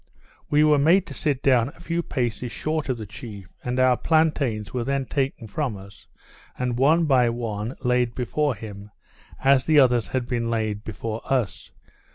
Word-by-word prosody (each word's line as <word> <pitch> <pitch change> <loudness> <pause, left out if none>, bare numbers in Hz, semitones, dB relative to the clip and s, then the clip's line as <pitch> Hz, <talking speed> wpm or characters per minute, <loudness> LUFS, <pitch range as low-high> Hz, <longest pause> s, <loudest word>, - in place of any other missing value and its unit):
We 150 +1 +4
were 150 -1 +5
made 170 +6 +4
to - - -9
sit 140 -4 -1
down 125 -3 +4
a 145 - -17
few 170 0 -2
paces 120 -5 -3
short 155 +1 -2
of 130 - 0
the 110 - -6
chief, 100 -2 -10
and 125 +1 -2
our 130 -1 +5
plantains 140 -9 +1
were 125 -2 -1
then 135 +2 -1
taken 135 -3 -2
from 115 0 -3
us, 95 -1 -14 0.5
and, 125 -1 -1
one 160 +5 +4
by 130 -5 +4
one, 115 0 -4
laid 125 -2 +1
before 140 +2 0
him, 105 -1 -9 0.5
as 135 -1 +4
the 155 -1 +4
others 120 -6 +4
had 120 +5 -2
been 120 -1 -1
laid 110 -2 -2
before 110 +1 -5
us. 115 - -1
125 Hz, 180 wpm, -24 LUFS, 110-140 Hz, 0.5 s, were